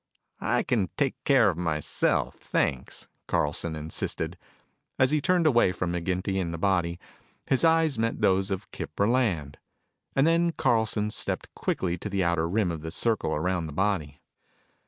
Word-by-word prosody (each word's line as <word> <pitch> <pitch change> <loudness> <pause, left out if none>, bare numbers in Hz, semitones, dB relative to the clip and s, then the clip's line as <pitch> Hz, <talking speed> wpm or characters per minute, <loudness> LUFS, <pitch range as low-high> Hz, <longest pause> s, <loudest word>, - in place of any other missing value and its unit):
"I - - +1
can 105 -8 0
take 140 -3 +1
care 125 -8 +5
of 85 - -9
myself, 80 -4 0
thanks," 65 -3 -2 0.2
Carlson 80 0 0
insisted. 80 +2 -3 0.6
As 130 0 +3
he 155 -1 +2
turned 180 +1 +2
away 120 -10 +4
from 90 -1 -2
McGinty 95 +2 -1
and 85 -2 -3
the 85 - -4
body, 85 -2 0 0.5
his 135 +2 +1
eyes 160 -5 +3
met 115 0 0
those 95 +1 +2
of 95 0 -4
Kip 75 - -7
Burland. 100 - +1 0.6
And 135 - +4
then 170 +1 +3
Carlson 110 -4 +1
stepped - - -3
quickly 90 -2 -2
to 105 - -5
the 100 -1 0
outer 85 -1 +1
rim 100 -1 +1
of 80 -2 -5
the 80 - -5
circle 110 -3 0
around 85 +1 -1
the 75 - -8
body. 80 -6 -1
95 Hz, 160 wpm, -27 LUFS, 85-115 Hz, 0.6 s, care